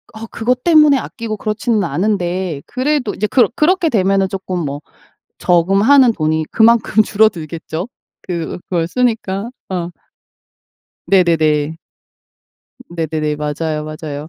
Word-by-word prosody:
어 220 +1 -7
그것 250 +2 -1
때문에 305 -4 +5
아끼고 230 -4 -5
그렇지는 215 0 -1
않은데 180 -2 -2
그래도 260 -4 -1
이제 210 - -2
그렇 245 +2 +3
그렇게 335 +1 +2
되면은 195 -4 +2
조끔 190 -1 -5
뭐 145 +1 -5 0.6
저금하는 200 +9 +4
돈이 155 -3 -1
그만큼 225 -1 +4
줄어들겠죠, 175 - -1 0.4
그 170 -3 -4
그걸 170 -2 -1
쓰니까. 225 -2 -1 0.2
어. 175 -2 -3 1.2
네네네. 160 -5 +2 1.1
네네네. 155 -3 -2
맞아요, 150 +1 -3
맞아요. 155 -1 -7
190 Hz, 275 characters per minute, -17 LUFS, 160-225 Hz, 1.2 s, 때문에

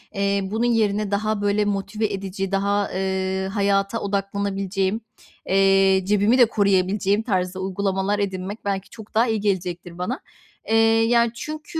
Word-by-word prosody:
eee, 200 0 +1
bunun 220 +5 -1
yerine 215 -3 +1
daha, 215 +1 0
böyle, 205 +1 +1
motive 205 +2 -2
edici, 195 -1 -4
daha, 200 +1 0
eee, 190 0 -1
hayata 200 +1 +1
odaklanabileceğim, 195 0 -2 0.5
eee, 195 0 +4
cebimi 210 +5 +3
de 245 - +7
koruyabileceğim 200 -1 +1
tarzı 185 -4 -1
uygulamalar 195 +1 -1
edinmek 195 +1 -4
belki 195 -1 -2
çok 220 -2 -13
daha 230 +3 +3
iyi 220 -1 0
gelecektir 180 -4 -3
bana. 225 - -3 0.5
Eee, 225 - +1 0.3
yani, 235 0 +3
çünkü 310 +5 -6
200 Hz, 135 wpm, -23 LUFS, 190-210 Hz, 0.5 s, de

